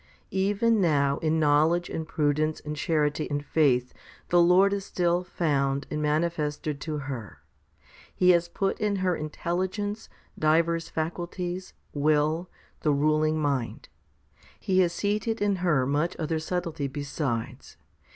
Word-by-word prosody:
6. -, -, -30 dB
Even 205 Hz, +3 st, +2 dB
now 140 Hz, -5 st, +2 dB
in 160 Hz, 0 st, +1 dB
knowledge 155 Hz, +3 st, +3 dB
and 160 Hz, -1 st, -5 dB
prudence 155 Hz, 0 st, 0 dB
and 150 Hz, 0 st, -6 dB
charity 150 Hz, -1 st, 0 dB
and 145 Hz, 0 st, -2 dB
faith 125 Hz, -6 st, +2 dB, 0.4 s
the 175 Hz, 0 st, +5 dB
Lord 185 Hz, +3 st, +5 dB
is 200 Hz, -1 st, -2 dB
still 175 Hz, -1 st, 0 dB
found 140 Hz, -6 st, 0 dB
and 150 Hz, 0 st, -2 dB
manifested 150 Hz, -1 st, -1 dB
to 155 Hz, -2 st, -3 dB
her. 130 Hz, -7 st, -7 dB, 0.7 s
He 180 Hz, 0 st, +5 dB
has 170 Hz, -1 st, +3 dB
put 195 Hz, +2 st, -1 dB
in 210 Hz, -1 st, 0 dB
her 185 Hz, -2 st, +1 dB
intelligence, 190 Hz, +7 st, -3 dB, 0.3 s
divers 165 Hz, +2 st, +2 dB
faculties, 175 Hz, +3 st, -4 dB, 0.2 s
will, 155 Hz, +4 st, +1 dB, 0.3 s
the 155 Hz, -, 0 dB
ruling 155 Hz, +2 st, +2 dB
mind. 140 Hz, -5 st, -2 dB, 0.7 s
He 190 Hz, -3 st, +1 dB
has 175 Hz, -2 st, +3 dB
seated 210 Hz, +4 st, -1 dB
in 205 Hz, -1 st, +1 dB
her 160 Hz, -8 st, +2 dB
much 145 Hz, +5 st, 0 dB
other 160 Hz, 0 st, -1 dB
subtlety 165 Hz, -3 st, -3 dB
besides. 135 Hz, -4 st, -4 dB
160 Hz, 135 wpm, -27 LUFS, 150-180 Hz, 0.7 s, the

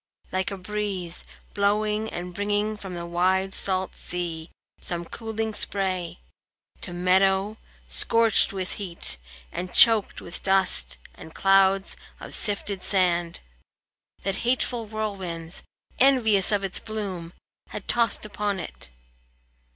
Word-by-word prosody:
Like 185 Hz, 0 st, 0 dB
a 200 Hz, -, -4 dB
breeze, 190 Hz, -3 st, -3 dB, 0.3 s
Blowing 210 Hz, +2 st, +1 dB
and 180 Hz, +1 st, -5 dB
bringing 205 Hz, +2 st, 0 dB
from 195 Hz, -3 st, -7 dB
the 170 Hz, 0 st, -4 dB
wide 185 Hz, +3 st, +1 dB
salt 190 Hz, -1 st, -1 dB
sea 170 Hz, -2 st, -4 dB, 0.3 s
Some 175 Hz, -1 st, -3 dB
cooling 220 Hz, +2 st, -3 dB
spray, 190 Hz, -4 st, -1 dB, 0.6 s
to -, -, -4 dB
meadow 190 Hz, +3 st, +3 dB, 0.3 s
scorched 225 Hz, -, +4 dB
with 190 Hz, -2 st, -3 dB
heat 170 Hz, -, -3 dB, 0.3 s
And 180 Hz, 0 st, -5 dB
choked 225 Hz, -3 st, +5 dB
with 170 Hz, -, -8 dB
dust 185 Hz, -, +2 dB, 0.2 s
and 160 Hz, -, -12 dB
clouds 195 Hz, 0 st, +4 dB, 0.2 s
of -, -, -8 dB
sifted 200 Hz, -2 st, -1 dB
sand, 175 Hz, -3 st, +1 dB, 0.8 s
That 195 Hz, 0 st, -1 dB
hateful 240 Hz, -2 st, 0 dB
whirlwinds, 190 Hz, -6 st, -3 dB, 0.4 s
envious 225 Hz, -8 st, +4 dB
of 205 Hz, -1 st, +2 dB
its 190 Hz, -2 st, -2 dB
bloom, 190 Hz, -6 st, -5 dB, 0.4 s
Had 210 Hz, -, -7 dB
tossed 230 Hz, -2 st, +2 dB
upon 205 Hz, -1 st, -1 dB
it. 65 Hz, -, -8 dB
195 Hz, 120 wpm, -26 LUFS, 180-210 Hz, 0.8 s, choked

